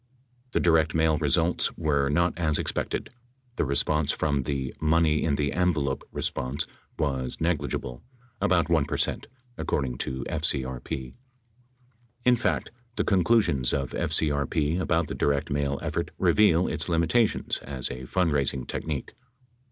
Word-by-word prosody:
The - - +2
direct 80 -2 +3
mail 80 -1 +3
results 80 +3 +2
were 70 -4 +1
not 85 +4 +2
as 80 -3 +1
expected. - - -2 0.5
The - - +1
response 75 +2 +2
from 70 -3 0
the 65 0 -3
"money 80 0 +3
in 75 -3 +1
the 70 0 -1
envelope" 75 -7 +1
response 70 +5 -2 0.3
was 65 -5 -2
negligible 70 -6 -2 0.2
— 120 -2 -33
about 85 -2 +3
1 80 -4 +2
per - - -3
cent, - - -1 0.3
according 65 -4 -1
to 65 0 -3
FCRP. 65 -3 -2 1.1
In 125 0 +6
fact, 120 - -1 0.2
the - - +1
conclusions 90 - +2
of 70 -2 -1
FCRP 75 0 0
about 85 -2 +1
the - - -4
direct 70 -1 0
mail 70 -1 0
effort - - -2
reveal 90 -5 +4
its - - -2
limitations 85 +7 +2
as 65 -3 -3
a 65 +1 -7
fundraising 70 -6 +1
technique. 75 -4 -4
75 Hz, 135 wpm, -27 LUFS, 70-85 Hz, 1.1 s, In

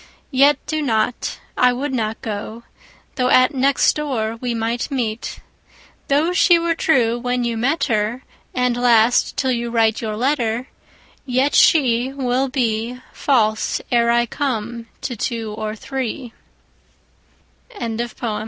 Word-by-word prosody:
20 260 - -6
Yet 285 0 +4
do 310 -1 -2
not; 235 -3 -1 0.2
I 250 0 +4
would 265 +3 -3
not 220 -3 -2
go, 220 +2 -5 0.5
Though 250 -1 +1
at 255 +2 +5
next 270 +1 +3
door 245 -7 -2
we 245 -2 -2
might 230 +3 -2
meet. 235 -5 -3 0.7
Though 305 +5 +2
she 355 -1 +5
were 335 0 0
true 245 -8 +2
when 245 0 -1
you 235 -1 -1
met 270 +8 0
her, 225 +1 -1 0.3
And 250 -1 +1
last 240 -1 +3
till 260 -1 +1
you 235 -1 -2
write 225 -2 +2
your 215 -2 -3
letter, 245 -1 0 0.6
Yet 260 +2 +1
she 250 -6 +4
25 270 0 -5
Will 255 +2 +1
be 240 -2 -1
False, 220 -6 +1
ere 235 -1 +3
I 235 0 +3
come, 235 -3 -3
to 250 - -4
tw 225 +3 -4
245 Hz, 135 wpm, -20 LUFS, 225-265 Hz, 0.7 s, at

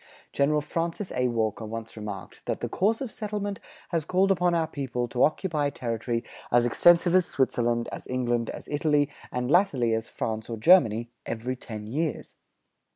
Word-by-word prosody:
General 150 +2 +2
Francis 165 +5 -3
A. 125 0 +1
Walker 115 -2 -1
once 115 +1 -6
remarked 105 -3 -7
that - - -1
"the - - -2
course 220 +6 +1
of 260 -5 -3
settlement 205 -3 -4 0.3
has 165 -3 0
called 185 +4 +2
upon 180 -2 +2
our 165 -1 +2
people 130 -5 -3
to 125 +1 -2
occupy 155 -2 +1
territory 115 -2 -2 0.3
as 120 0 +4
extensive 175 +7 +5
as 185 -2 +4
Switzerland, 120 -3 0
as - - -7
England, 120 -2 0
as - - -7
Italy, 150 -1 +1 0.2
and 125 +1 -2
latterly, 140 - +3
as 110 +1 -2
France 110 0 -3
or 115 - -3
Germany, 115 - +4 0.2
every 115 +3 -3
ten 110 -4 -8
years." 150 +8 -3
130 Hz, 165 wpm, -27 LUFS, 115-170 Hz, 0.3 s, extensive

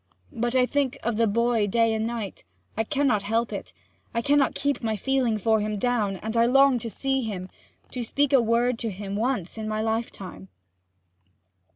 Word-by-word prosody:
But 240 0 -1
I 255 -1 +5
think 275 -1 0
of 235 -1 -1
the 230 0 +3
boy 230 0 +2
day 230 +2 +2
and 220 0 -1
night 230 -5 -5 0.3
I 220 - +1
cannot 265 -4 +1
help 225 +4 -1
it - - -6 0.4
I 230 - 0
cannot 280 0 +3
keep 285 0 -1
my 220 -2 -1
feeling 250 0 +1
for 220 +1 +2
him 210 0 -2
down; 215 -3 0
and 220 +1 -3
I 230 0 +4
long 270 0 +5
to 230 - -5
see 270 +3 -1
him, 190 -5 -5 0.4
and 250 - -3
speak 280 +4 0
a 265 - +7
word 235 +1 +1
to 230 - -2
him 200 0 -5
once 220 -3 -1
in 215 - -4
my 215 0 -1
lifetime!' 220 - -4
230 Hz, 190 wpm, -25 LUFS, 215-250 Hz, 0.4 s, a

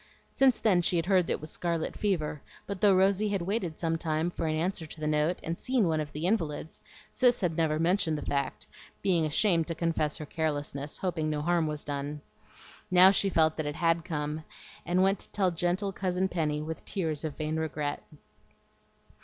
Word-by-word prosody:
Since 265 -3 +3
then 190 -5 +4
she 175 - 0
had 165 -1 +1
heard 185 -2 +3
that - - +1
it - - -4
was 155 - -5
scarlet 170 -2 -2
fever; 160 -8 -1 0.2
but 200 -2 -5
though 200 -2 +6
Rosy 195 +2 +3
had 200 -3 -1
waited 185 -4 -2
some 165 -1 -1
time 160 +1 -1
for 165 - -3
an 155 - 0
answer 165 0 -2
to 155 - -9
the 155 - -3
note, 150 +3 +1
and 165 +1 -3
seen 250 -7 +1
one 160 -1 +1
of 150 -1 -4
the 150 +3 -4
invalids, 160 -6 -1 0.3
Cis 245 -2 +3
had 175 -4 0
never 155 -2 +1
mentioned 165 -1 +1
the - - -6
fact, 140 -2 -2 0.4
being 170 -5 +2
ashamed 165 +1 +2
to 165 - -3
confess 160 -2 0
her 155 - -6
carelessness, 145 -2 -3
hoping 170 -4 -1
no 150 -1 -2
harm 170 -1 +2
was 150 -1 -3
done. 145 +1 -4 0.7
Now 185 +1 +8
she 200 0 +2
felt 160 -3 +3
that 155 -2 -2
it 145 - -3
HAD 165 0 +1
come, 150 -1 -3 0.4
and 180 +2 +3
went 195 0 +2
to - - -8
tell 190 -3 +1
gentle 175 +4 0
Cousin 185 0 -1
Penny 150 -4 -1
with 160 +1 -6
tears 160 -7 -2
of 155 -3 -4
vain 155 0 -2
regret. 150 -2 -2
165 Hz, 205 wpm, -29 LUFS, 155-185 Hz, 0.7 s, Now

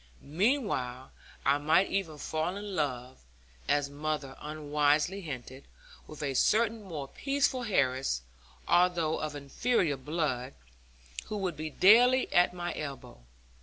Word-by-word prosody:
Meanwhile 150 - -1 0.3
I 140 +1 +3
might 155 +6 +3
even 170 -6 -2
fall 160 +4 -2
in 205 -1 -6
love 130 -4 -3 0.5
(as 145 -1 +2
mother 145 -1 -4
unwisely 150 +4 0
hinted) 135 -4 -8 0.4
with 155 0 -8
a 140 -2 -1
certain 220 - +2
more 160 -8 -6
peaceful 275 - 0
heiress, 130 - 0 0.4
although 175 -3 +2
of 155 -1 -4
inferior 145 - 0
blood, 135 - -2 0.7
who 215 - -4
would 185 -5 -2
be 155 +1 -5
daily 245 - +5
at 175 0 +5
my 175 -1 -4
elbow. 135 - -7
155 Hz, 125 wpm, -30 LUFS, 140-190 Hz, 0.7 s, daily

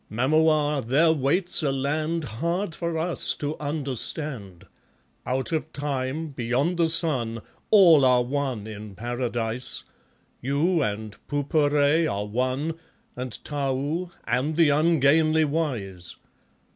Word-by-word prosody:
Mamua, 150 +4 +2
there 155 +6 +4
waits 170 +7 0
a 145 -3 +1
land 155 +5 -1
Hard 170 - -2
for 170 +1 -3
us 170 +1 +1
to 150 +1 -3
understand. 140 - -4 0.6
Out 130 +4 -1
of 160 -1 -2
time, 145 +2 -3
beyond 135 +6 -1
the 165 -1 +2
sun, 130 -9 +2 0.3
All 170 -9 +7
are 125 -1 +4
one 130 -4 -2
in 105 -2 -9
Paradise, 120 +1 -3 0.6
You 155 +7 +1
and 105 -3 -3
Pupure 145 +2 +2
are 100 +1 -2
one, 130 +9 -2 0.4
And 125 -4 -6
Tau, 145 +4 -2
and 145 +5 -1
the 165 -2 +4
ungainly 155 +1 +3
wise. 115 - -3
145 Hz, 115 wpm, -25 LUFS, 125-160 Hz, 0.6 s, All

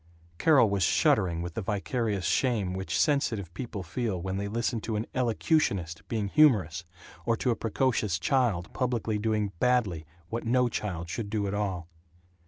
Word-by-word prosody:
Carol 150 -8 +5
was 100 -1 -1
shuddering 85 0 +2
with 85 -1 -5
the 115 - -3
vicarious 105 0 -1
shame 110 -8 +1
which 95 +1 -2
sensitive 115 - +1
people 110 -4 -5
feel 100 +2 -2
when 95 +2 -3
they 100 +1 -2
listen 115 +1 -1
to 110 - -3
an 105 +2 -1
"elocutionist" 110 - 0
being 110 -3 -1
humorous, 95 - +3 0.4
or 115 +3 +1
to 125 - +1
a - - +1
precocious 110 -5 0
child 100 -3 0
publicly 115 -4 -1
doing 105 -2 0
badly 105 -11 +1 0.2
what 115 +1 -3
no 125 +1 +2
child 90 -7 -4
should 100 +4 -4
do 105 -1 -1
at 100 - -2
all. 95 -5 -2
105 Hz, 165 wpm, -28 LUFS, 95-120 Hz, 0.4 s, Carol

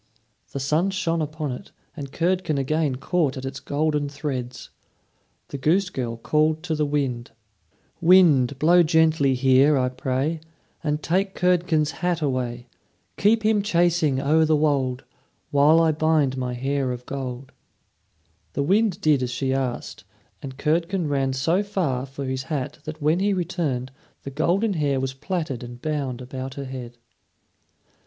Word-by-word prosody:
The 140 - -4
sun 155 +8 +1
shone 170 -4 -1
upon 155 -1 -3
it, 125 - -8 0.2
and 140 -3 -7
Curdken 175 -2 0
again 145 0 0
caught 140 +1 0
at 130 - -6
its 135 0 -5
golden 150 0 -1
threads. 135 -4 -5 0.8
The 140 - -6
goose 180 +7 +2
girl 120 -5 -3
called 155 +6 +1
to 175 -3 -2
the 150 -1 0
wind: 135 -5 -2 0.7
"Wind, 160 -8 +5
blow 170 +5 +5
gently 160 -4 +3
here, 135 +3 +4
I 125 -1 +1
pray, 130 +5 -2 0.4
And 150 0 -1
take 190 +3 0
Curdken's 170 -4 +2
hat 175 +2 -1
away. 125 -5 -2 0.5
Keep 220 +2 +3
him 215 -1 +3
chasing 170 -7 +2
o'er 155 +4 +3
the 155 0 +3
wold, 135 -4 0 0.5
While 145 +3 +5
I 165 -1 +4
bind 155 -3 +1
my 125 -1 -3
hair 135 +1 -1
of 125 0 -6
gold." 130 -1 -6 1.0
The 140 - 0
wind 195 +3 +2
did 150 -6 +3
as 125 - -1
she 130 +2 -1
asked, 130 -4 -3 0.4
and 135 -3 -8
Curdken 165 +2 0
ran 135 -2 0
so 165 +9 +1
far 160 -11 -2
for 135 +1 -6
his 130 0 -2
hat 140 -3 -3
that 155 -1 -7
when 155 +4 +3
he 200 +1 +2
returned 160 -8 -2 0.3
the 140 - -6
golden 180 +9 +1
hair 145 -5 0
was 130 0 -2
plaited 150 -2 -3
and 120 0 -9
bound 140 -4 -3
about 130 +1 -6
her 140 - -5
head. 125 -2 -8
145 Hz, 155 wpm, -24 LUFS, 130-165 Hz, 1.0 s, Wind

